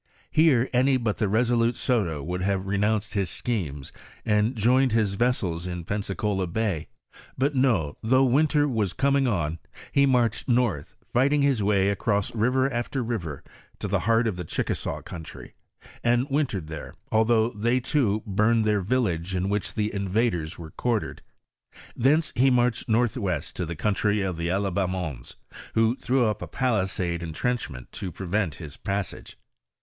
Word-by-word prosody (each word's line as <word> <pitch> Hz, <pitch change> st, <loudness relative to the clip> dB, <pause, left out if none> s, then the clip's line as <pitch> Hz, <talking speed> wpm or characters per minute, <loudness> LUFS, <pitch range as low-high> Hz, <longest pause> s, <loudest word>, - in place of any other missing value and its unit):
Here 145 Hz, -6 st, +4 dB
any 130 Hz, +2 st, +4 dB
but 115 Hz, -4 st, -1 dB
the 105 Hz, -4 st, 0 dB
resolute 115 Hz, +2 st, +2 dB
Soto 90 Hz, -, 0 dB
would 90 Hz, +3 st, -3 dB
havcTenounced 100 Hz, +2 st, 0 dB
his 100 Hz, -4 st, 0 dB
schemes, 80 Hz, -, -3 dB, 0.3 s
and 105 Hz, +4 st, +2 dB
joined 125 Hz, +3 st, +3 dB
his 110 Hz, -3 st, +2 dB
vessels 95 Hz, -7 st, 0 dB
in 90 Hz, -1 st, -4 dB
Pensacola 100 Hz, -1 st, -1 dB
bay; 100 Hz, -3 st, -2 dB, 0.5 s
but 140 Hz, +3 st, +1 dB
no, 115 Hz, -, +1 dB
though 130 Hz, +4 st, +3 dB
winter 145 Hz, +3 st, +3 dB
was 110 Hz, -8 st, 0 dB
coming 140 Hz, -1 st, +2 dB
on, 85 Hz, -7 st, -1 dB, 0.3 s
he 140 Hz, 0 st, +4 dB
marched 120 Hz, -2 st, +1 dB
north, 120 Hz, -, +1 dB, 0.2 s
fighting 140 Hz, +4 st, +3 dB
his 135 Hz, -6 st, +2 dB
way 100 Hz, -1 st, +3 dB
across 100 Hz, 0 st, 0 dB
river 125 Hz, +4 st, +2 dB
after 120 Hz, +2 st, -2 dB
river 90 Hz, -, -4 dB, 0.3 s
to -, -, -4 dB
the -, -, +1 dB
heart 115 Hz, +1 st, +4 dB
of 105 Hz, -5 st, -1 dB
the 90 Hz, -, -4 dB
Chickasaw 80 Hz, -, -3 dB
country, 80 Hz, -2 st, -9 dB, 0.5 s
and 120 Hz, +1 st, +3 dB
win 145 Hz, +1 st, +2 dB
tered 95 Hz, -8 st, -5 dB
there, 80 Hz, -1 st, -8 dB, 0.2 s
although 110 Hz, +1 st, +3 dB
they, 120 Hz, +4 st, +1 dB
too, 120 Hz, -6 st, 0 dB
burned 110 Hz, +3 st, +2 dB
their 105 Hz, -2 st, +2 dB
yillage 95 Hz, -5 st, 0 dB
in 95 Hz, +1 st, 0 dB
which 105 Hz, 0 st, -2 dB
the 105 Hz, -1 st, -1 dB
invaders 100 Hz, -4 st, -1 dB
were 80 Hz, -2 st, -9 dB
quartered; 120 Hz, -3 st, -2 dB, 0.7 s
thence 150 Hz, +6 st, +2 dB
he 135 Hz, +3 st, +4 dB
marched 125 Hz, -1 st, +1 dB
northwest 100 Hz, -8 st, 0 dB
to 90 Hz, -, -3 dB
the 85 Hz, -, -4 dB
country 105 Hz, +4 st, +1 dB
of 95 Hz, -2 st, -2 dB
the 85 Hz, +1 st, -3 dB
Alibamons, 90 Hz, -7 st, -2 dB, 0.4 s
who 115 Hz, +2 st, +3 dB
threw 130 Hz, -1 st, +1 dB
up 105 Hz, -1 st, -1 dB
a -, -, -5 dB
palisade 95 Hz, -8 st, -1 dB
entrenchment 80 Hz, -, -3 dB
to 95 Hz, -, -5 dB
prevent 95 Hz, -1 st, -2 dB
his 75 Hz, -4 st, -9 dB
passage. 100 Hz, -1 st, -4 dB
105 Hz, 155 wpm, -26 LUFS, 95-120 Hz, 0.7 s, Here